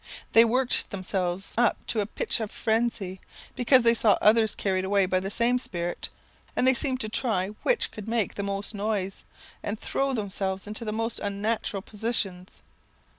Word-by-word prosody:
They 225 Hz, -, +8 dB
worked 250 Hz, +2 st, +1 dB
themselves 185 Hz, -1 st, -2 dB
up 240 Hz, -2 st, +3 dB
to 225 Hz, -, -1 dB
a 205 Hz, -, 0 dB
pitch -, -, -1 dB
of 220 Hz, -2 st, -3 dB
frenzy, 220 Hz, -5 st, -1 dB, 0.3 s
because 255 Hz, 0 st, +5 dB
they 230 Hz, 0 st, +6 dB
saw 220 Hz, -2 st, +4 dB
others 220 Hz, 0 st, +4 dB
carried 190 Hz, -2 st, 0 dB
away 195 Hz, 0 st, +3 dB
by 185 Hz, 0 st, +1 dB
the 190 Hz, +1 st, -4 dB
same 235 Hz, +4 st, +2 dB
spirit; 175 Hz, -7 st, -3 dB, 0.5 s
and -, -, +2 dB
they 260 Hz, -, +6 dB
seemed 260 Hz, 0 st, 0 dB
to 215 Hz, -, -1 dB
try 215 Hz, -4 st, 0 dB
which -, -, +1 dB
could 215 Hz, -1 st, -9 dB
make 225 Hz, -3 st, 0 dB
the -, -, -4 dB
most 200 Hz, +1 st, -3 dB
noise, 200 Hz, -2 st, -2 dB, 0.4 s
and 205 Hz, +1 st, -4 dB
throw 275 Hz, 0 st, -1 dB
themselves 195 Hz, -3 st, -2 dB
into 215 Hz, +3 st, -4 dB
the 215 Hz, -, -3 dB
most 225 Hz, +2 st, -2 dB
unnatural 205 Hz, 0 st, -2 dB
positions. 205 Hz, -5 st, -3 dB
215 Hz, 175 wpm, -27 LUFS, 195-230 Hz, 0.5 s, They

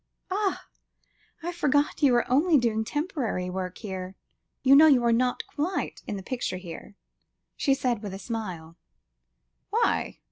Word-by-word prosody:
"Ah! 395 Hz, 0 st, -1 dB, 0.8 s
I 345 Hz, -, -2 dB
forgot 290 Hz, -3 st, +1 dB
you 270 Hz, -4 st, +5 dB
are 240 Hz, -, +2 dB
only 300 Hz, +5 st, +4 dB
doing 225 Hz, -3 st, +1 dB
temporary 260 Hz, -, -2 dB
work 185 Hz, -1 st, -4 dB
here. 190 Hz, -3 st, -6 dB, 0.5 s
You 270 Hz, +1 st, +7 dB
know 310 Hz, +3 st, +9 dB
you 265 Hz, -5 st, +5 dB
are 235 Hz, -, +3 dB
not 250 Hz, +1 st, +1 dB
quite 335 Hz, +6 st, -3 dB
'in 205 Hz, -, -3 dB
the 190 Hz, -, -7 dB
picture' 245 Hz, -5 st, -3 dB
here," 180 Hz, +2 st, -9 dB, 0.6 s
she 275 Hz, -2 st, +2 dB
said 245 Hz, -5 st, -1 dB
with 200 Hz, -3 st, -5 dB
a -, -, -5 dB
smile. 185 Hz, -6 st, -6 dB, 0.9 s
"Why?" -, -, 0 dB
240 Hz, 150 wpm, -27 LUFS, 190-290 Hz, 0.9 s, know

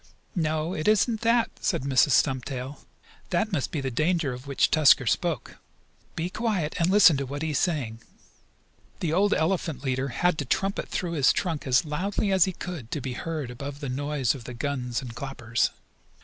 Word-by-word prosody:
"No, 160 Hz, -1 st, -1 dB
it 155 Hz, -, -3 dB
isn't 215 Hz, +1 st, +3 dB
that," 235 Hz, 0 st, +2 dB
said -, -, -1 dB
Mrs. 135 Hz, 0 st, +3 dB
Stumptail. 130 Hz, 0 st, 0 dB, 0.5 s
"That 220 Hz, -, 0 dB
must 150 Hz, -8 st, -1 dB
be 150 Hz, -, -3 dB
the 135 Hz, -1 st, -3 dB
danger 155 Hz, +1 st, +1 dB
of 125 Hz, +3 st, -9 dB
which 140 Hz, -, +2 dB
Tusker 145 Hz, -4 st, +5 dB
spoke. 110 Hz, -, -1 dB, 0.6 s
Be 160 Hz, -, -2 dB
quiet 205 Hz, -9 st, -1 dB
and 170 Hz, +1 st, +2 dB
listen 185 Hz, -6 st, +7 dB
to 140 Hz, -, -2 dB
what 145 Hz, +3 st, -5 dB
he 160 Hz, -, -1 dB
is 145 Hz, -, +1 dB
saying." 125 Hz, -10 st, -1 dB, 1.0 s
The 160 Hz, -3 st, -1 dB
old 200 Hz, +4 st, +3 dB
elephant 160 Hz, -6 st, 0 dB
leader 130 Hz, 0 st, -1 dB
had 175 Hz, +6 st, 0 dB
to 145 Hz, -, -2 dB
trumpet 195 Hz, +9 st, -1 dB
through 175 Hz, -2 st, -2 dB
his 145 Hz, -5 st, +4 dB
trunk 165 Hz, -6 st, -2 dB
as 130 Hz, +4 st, +3 dB
loudly 195 Hz, +6 st, -1 dB
as 190 Hz, -3 st, +5 dB
he 190 Hz, -, -2 dB
could 165 Hz, -10 st, -7 dB
to 150 Hz, -, -3 dB
be 130 Hz, -1 st, -4 dB
heard 155 Hz, -2 st, -4 dB
above 140 Hz, +3 st, -7 dB
the 140 Hz, -3 st, -4 dB
noise 140 Hz, -1 st, 0 dB
of 130 Hz, -5 st, -10 dB
the 125 Hz, -, -7 dB
guns 125 Hz, -1 st, -2 dB
and 120 Hz, -2 st, -7 dB
clappers. 120 Hz, -4 st, -1 dB
150 Hz, 190 wpm, -26 LUFS, 130-175 Hz, 1.0 s, listen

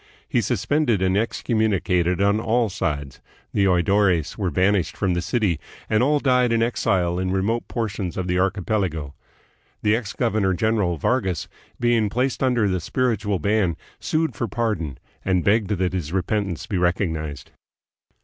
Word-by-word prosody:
He -, -, +1 dB
suspended 145 Hz, -8 st, +1 dB
and 95 Hz, 0 st, +2 dB
excommunicated 100 Hz, -5 st, +1 dB
on 100 Hz, +2 st, +3 dB
all 115 Hz, 0 st, +1 dB
sides. 75 Hz, -8 st, -3 dB, 0.3 s
The 100 Hz, -, +3 dB
oidores 90 Hz, -1 st, +2 dB
were 95 Hz, -4 st, -1 dB
banished 95 Hz, +3 st, +1 dB
from 95 Hz, -2 st, +1 dB
the 85 Hz, -, 0 dB
city, 100 Hz, -, 0 dB, 0.3 s
and 110 Hz, +1 st, +3 dB
all 145 Hz, +4 st, +3 dB
died 125 Hz, -3 st, +3 dB
in 115 Hz, 0 st, +3 dB
exile 90 Hz, -7 st, +1 dB
in 95 Hz, 0 st, -1 dB
remote 100 Hz, +5 st, 0 dB
portions 100 Hz, -6 st, -3 dB
of 95 Hz, -, -1 dB
the 90 Hz, 0 st, 0 dB
archipelago. 95 Hz, -6 st, -1 dB, 0.7 s
The 105 Hz, 0 st, +4 dB
ex 110 Hz, -4 st, -4 dB
governor 95 Hz, -3 st, +1 dB
general, 100 Hz, -3 st, +1 dB
Vargas, 95 Hz, -, 0 dB, 0.3 s
being 120 Hz, -3 st, +2 dB
placed 125 Hz, +4 st, -1 dB
under 125 Hz, -5 st, +2 dB
the 95 Hz, -2 st, 0 dB
spiritual 110 Hz, -4 st, 0 dB
ban, 100 Hz, -1 st, +1 dB, 0.2 s
sued 160 Hz, 0 st, -1 dB
for 120 Hz, -, -2 dB
pardon 100 Hz, -, -2 dB, 0.3 s
and 90 Hz, -2 st, +1 dB
begged 105 Hz, 0 st, +2 dB
that 95 Hz, -3 st, 0 dB
his 85 Hz, -5 st, -3 dB
repentance 95 Hz, -1 st, -1 dB
be 95 Hz, -, -2 dB
recognized. 80 Hz, -4 st, -1 dB
100 Hz, 150 wpm, -23 LUFS, 90-110 Hz, 0.7 s, The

